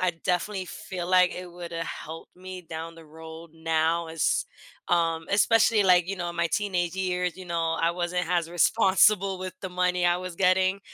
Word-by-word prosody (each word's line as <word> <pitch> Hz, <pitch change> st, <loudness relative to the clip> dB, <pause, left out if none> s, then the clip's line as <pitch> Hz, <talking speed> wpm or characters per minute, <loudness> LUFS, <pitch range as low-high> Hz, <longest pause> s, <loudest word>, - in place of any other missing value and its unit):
I 185 Hz, -2 st, +1 dB
definitely 185 Hz, +2 st, -1 dB
feel 185 Hz, -2 st, -7 dB
like 185 Hz, -1 st, +4 dB
it 180 Hz, 0 st, -7 dB
woulda 170 Hz, -1 st, -6 dB
helped 165 Hz, 0 st, -8 dB
me 185 Hz, 0 st, -9 dB
down 165 Hz, 0 st, -7 dB
the 165 Hz, -, -13 dB
road 160 Hz, +1 st, -11 dB
now 165 Hz, +1 st, 0 dB
as, 150 Hz, -, 0 dB, 0.4 s
um 165 Hz, -2 st, +1 dB
especially, 215 Hz, +1 st, +4 dB
like, 180 Hz, -2 st, +4 dB
you 195 Hz, -, -3 dB
know, 175 Hz, -1 st, -3 dB
in -, -, -10 dB
my 170 Hz, 0 st, +1 dB
teenage 180 Hz, -3 st, -1 dB
years, 180 Hz, -2 st, -1 dB
you 185 Hz, -, -9 dB
know, 165 Hz, -2 st, -1 dB
I 165 Hz, +1 st, +2 dB
wasn't 180 Hz, +1 st, -2 dB
has 170 Hz, -1 st, 0 dB
responsible 195 Hz, +1 st, +3 dB
with 185 Hz, -1 st, -6 dB
the 190 Hz, -, -5 dB
money 180 Hz, 0 st, 0 dB
I 175 Hz, 0 st, +3 dB
was 180 Hz, -1 st, -6 dB
getting, 185 Hz, +2 st, +2 dB
180 Hz, 185 wpm, -26 LUFS, 165-185 Hz, 0.4 s, like